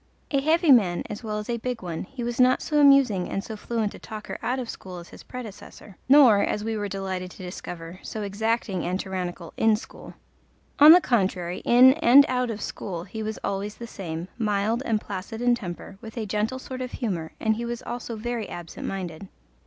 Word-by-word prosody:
A 275 -2 +2
heavy 320 +2 +4
man 195 -9 +4
as 210 - -6
well 215 -1 -3
as 210 - -5
a 235 - -1
big 240 -2 -4
one, 170 -1 -4
he 250 +4 -7
was 240 +1 -3
not 255 0 +4
so 300 -1 +1
amusing 275 -10 +5
and 195 - -3
so 220 - -6
fluent 220 -1 -2
a - - -11
talker 215 -1 -7
out 250 +2 -1
of 255 -2 -4
school 185 -4 -8
as 170 0 -10
his - - -12
predecessor, 215 -4 -10
nor, 260 -8 +7
as 210 - -1
we 225 0 -2
were 205 -1 -2
delighted 190 -2 -4
to 185 - -11
discover, 175 -1 -8
so 215 - -5
exacting 205 -1 -1
and 180 +2 -1
tyrannical 180 -3 -5
in 220 -1 +4
school. 215 - -10 0.6
On 300 +2 +11
the 355 +2 +9
contrary, 185 - 0
in 255 +2 +7
and 280 +1 +8
out 250 -1 0
of 220 -2 -4
school 175 -4 -5
he 210 +4 -7
was 215 0 -3
always 200 +1 -3
the 235 - -8
same, 170 -6 -6
mild 215 +2 0
and 220 -2 +2
placid 200 +2 -6
in 245 0 +3
temper, 190 -3 -6
with 225 0 -10
a 225 - -2
gentle 210 +5 -1
sort 260 0 -7
of 250 0 -5
humour, 180 -10 -3
and 220 -1 +1
he 235 - -3
was 235 0 -5
also 240 -1 -5
very 230 0 -4
absent 175 -2 -7
minded. 185 -1 -5
215 Hz, 210 wpm, -25 LUFS, 190-240 Hz, 0.6 s, On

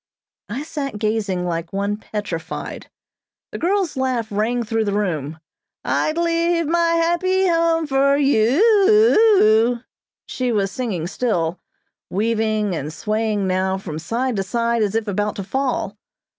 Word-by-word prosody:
I 245 +7 -4
sat 290 -7 -5
gazing 210 -4 -1
like 170 -1 -3
one 200 +1 -1
petrified. 205 -6 -6 0.6
The - - -6
girl's 370 -3 0
laugh 255 -4 -1
rang 225 +4 0
through 225 0 -1
the 200 -1 -1
room. 160 -7 -2 0.5
"I'd 310 +1 0
Leave 335 0 +1
my 335 +2 +2
Happy 370 +3 +2
Home 330 -1 +2
for 275 0 +2
You, 275 - +3 0.3
ou 420 - +5
ou," - - -9 0.5
she 255 -1 -2
was 200 -3 0
singing 220 -11 -3
still, 175 -5 -1 0.5
weaving 215 -1 0
and 150 -1 -4
swaying 215 +4 -1
now 190 +1 0
from 160 -5 -6
side 235 +7 -2
to - - +1
side 235 +3 0
as 210 0 0
if 225 -1 -1
about 205 +1 -1
to 200 - -4
fall. 255 -3 -2
225 Hz, 145 wpm, -21 LUFS, 200-290 Hz, 0.6 s, ou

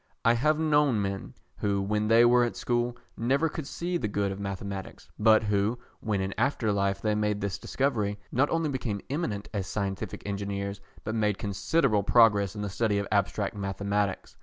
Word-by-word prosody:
I 115 - +6
have 150 +6 +2
known 150 -6 +3
men, 100 -1 -3 0.2
who 100 -1 0
when 105 +2 0
they 115 +2 +6
were 120 +1 +5
at 120 - -1
school, 120 0 -1 0.2
never 135 +7 +1
could 150 -2 -6
see 175 +3 -2
the 115 - -2
good 100 -1 -1
of 95 - -6
mathematics, 100 -1 -6
but 110 +1 +5
who, 105 +2 +1 0.2
when 105 -3 -1
in 95 0 -2
after 115 -6 +1
life 100 -1 0
they 110 -1 +2
made 105 -1 0
this 100 -1 -3
discovery, 110 -7 -1
not 135 +4 +2
only 165 -2 0
became 120 -7 -3
eminent 115 -10 -2
as 100 -3 -2
scientific 95 0 -3
engineers, 100 0 -3 0.2
but 110 - -3
made 105 -3 +1
considerable 105 - +1
progress 105 -2 +4
in 105 - -4
the - - -2
study 105 +1 0
of 100 - -1
abstract 100 0 0
mathematics. 100 0 -2
105 Hz, 185 wpm, -28 LUFS, 100-120 Hz, 0.2 s, I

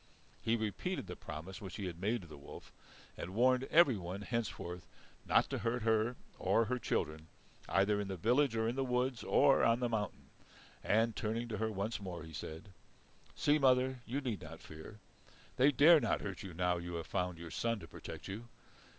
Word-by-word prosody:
He 115 - +2
repeated 110 - -2
the 90 - -7
promise 80 +5 -8
which 95 -2 -7
he 100 - -4
had 85 -1 -6
made 110 +3 0
to - - -12
the 75 - -10
wolf, 70 0 -12 0.4
and 90 +3 -6
warned 130 +2 +4
everyone 105 - +3
henceforth 95 -6 -4 0.4
not - - +4
to - - -1
hurt 120 0 -1
her 110 +2 +2 0.2
or 100 +5 +3
her 125 +2 -1
children, 80 -6 -2 0.4
either 100 +1 +3
in 100 - -4
the 95 -1 -4
village 125 - +3
or 110 0 +1
in 120 - -1
the 135 - 0
woods 125 -1 0
or 140 -1 +5
on 115 +1 +4
the 120 -1 0
mountain. 105 -4 -3 0.5
And, 115 +1 +2
turning 115 +2 -2
to 110 - -3
her 110 0 0
once 105 +2 -3
more, 90 -4 -6
he 80 0 -10
said: 80 +7 -7 0.7
"See, 150 +1 +3
mother, 130 -1 +3
you 135 +5 -2
need 120 -8 -3
not 80 0 -9
fear. 80 +7 -10 0.6
They 135 +3 +6
dare 150 +5 +7
not 115 - 0
hurt 95 -4 -5
you 95 -4 -8
now 90 0 +1
you 85 0 -5
have 85 -1 -4
found 90 -2 -2
your 85 -1 -8
son 115 0 0
to 80 - -10
protect - - -8
you. 110 +5 -6
110 Hz, 195 wpm, -35 LUFS, 90-125 Hz, 0.7 s, dare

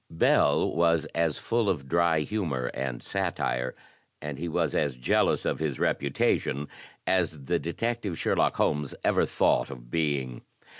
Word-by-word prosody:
Bell 80 - +3
was 85 -1 +3
as 80 -2 +1
full 115 -3 0
of 75 -8 -2
dry 85 0 +3
humor 75 -10 -2
and 65 -2 -4
satire, 60 +1 -2 0.4
and 75 -2 -6
he 85 - -3
was 80 - 0
as 70 -4 0
jealous 60 - +2
of - - -1
his 75 -4 -2
reputation, 70 0 0 0.4
as 85 -6 0
the 85 +4 +1
detective 105 +1 -2
Sherlock - - +1
Holmes 75 -2 0
ever - - +3
thought - - +2
of - - -10
being. 70 -6 -1
75 Hz, 145 wpm, -27 LUFS, 65-85 Hz, 0.4 s, Bell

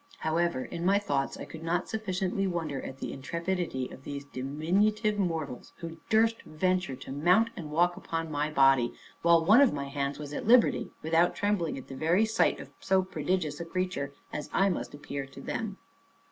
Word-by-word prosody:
However, 160 -4 0
in 170 - -5
my 195 +3 +4
thoughts, 140 -9 -1
I - - -6
could 160 - -10
not 165 +2 -1
sufficiently 195 -2 -1
wonder 160 -7 -2
at 135 - -7
the - - -5
intrepidity 170 -1 -2
of 130 - -12
these 140 0 -6
diminutive 190 - 0
mortals, 160 -9 -3
who 165 -1 -7
durst 225 +1 +3
venture 180 -2 -1
to 130 - -9
mount 180 +11 +3
and 155 -4 -6
walk 175 +3 +2
upon 165 -1 -4
my 150 +1 0
body, 135 -4 +4 0.3
while 170 -1 +5
one 215 +9 +7
of 280 - +5
my 140 -1 -4
hands 140 0 -2
was 150 -1 -7
at - - -4
liberty, 240 0 +5
without 165 +2 +3
trembling 205 -7 0
at 135 - -9
the 135 - -8
very 170 +9 +3
sight 220 +1 +2
of - - -10
so 190 0 +2
prodigious 175 -2 -2
a - - -3
creature, 180 -5 -2 0.2
as 150 - -4
I 195 +1 +3
must 175 - -3
appear 140 -1 -5
to 135 - -12
them. - - -4
165 Hz, 190 wpm, -29 LUFS, 145-190 Hz, 0.3 s, one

